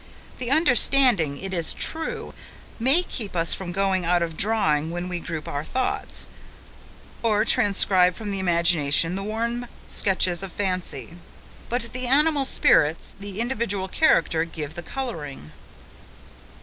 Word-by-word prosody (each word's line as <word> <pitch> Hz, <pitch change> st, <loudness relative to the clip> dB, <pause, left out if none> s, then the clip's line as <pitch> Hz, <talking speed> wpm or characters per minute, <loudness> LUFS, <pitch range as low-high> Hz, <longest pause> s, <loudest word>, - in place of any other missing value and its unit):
The 250 Hz, -1 st, -2 dB
understanding, 255 Hz, -, +4 dB
it 190 Hz, +3 st, -5 dB
is 170 Hz, -3 st, 0 dB
true, 445 Hz, +8 st, -3 dB, 0.5 s
may 270 Hz, +10 st, +3 dB
keep 210 Hz, -, -6 dB
us 170 Hz, -1 st, +2 dB
from 185 Hz, -2 st, -5 dB
going 190 Hz, 0 st, 0 dB
out 175 Hz, 0 st, +1 dB
of 165 Hz, -1 st, -5 dB
drawing 160 Hz, -7 st, +1 dB
when 175 Hz, +1 st, -5 dB
we 180 Hz, -1 st, -4 dB
group 160 Hz, -2 st, -6 dB
our 145 Hz, +1 st, -4 dB
thoughts, 255 Hz, +10 st, -1 dB, 0.9 s
or 215 Hz, -2 st, +1 dB
transcribe 185 Hz, -3 st, +4 dB
from 210 Hz, -2 st, -6 dB
the 195 Hz, -, -2 dB
imagination 170 Hz, -3 st, +3 dB
the 195 Hz, -, -4 dB
warm 235 Hz, +4 st, -3 dB, 0.2 s
sketches 185 Hz, -3 st, +1 dB
of 195 Hz, -2 st, -7 dB
fancy; 185 Hz, -3 st, -3 dB, 0.5 s
but 235 Hz, -1 st, -3 dB
the 255 Hz, 0 st, -3 dB
animal 290 Hz, +1 st, +2 dB
spirits, 160 Hz, -, +2 dB
the 200 Hz, 0 st, -7 dB
individual 230 Hz, -5 st, -1 dB
character 170 Hz, -, +2 dB
give 155 Hz, -3 st, -7 dB
the 175 Hz, -, -7 dB
colouring. 155 Hz, -, -7 dB
190 Hz, 135 wpm, -23 LUFS, 170-235 Hz, 0.9 s, understanding